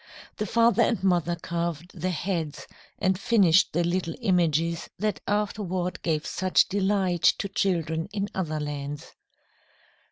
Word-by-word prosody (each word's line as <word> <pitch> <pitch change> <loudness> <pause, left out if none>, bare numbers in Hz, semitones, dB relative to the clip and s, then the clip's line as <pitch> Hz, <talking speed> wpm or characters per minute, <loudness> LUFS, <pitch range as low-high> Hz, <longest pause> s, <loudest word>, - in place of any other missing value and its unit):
The 210 - -2
father 230 +2 +3
and 230 -3 +1
mother 175 -2 +2
carved 170 0 -4
the 185 - 0
heads 170 -3 -3 0.3
and 190 0 +1
finished 195 -5 +4
the 170 +2 +1
little 175 -1 -1
images 170 -5 +1
that 210 +2 -2
afterward 200 -3 -1
gave 155 -3 -1
such 185 0 +2
delight 190 -3 0 0.2
to - - -2
children 165 -4 -1
in 200 -1 -2
other 155 -5 -2
lands. 145 -1 -5
180 Hz, 130 wpm, -26 LUFS, 165-195 Hz, 0.3 s, finished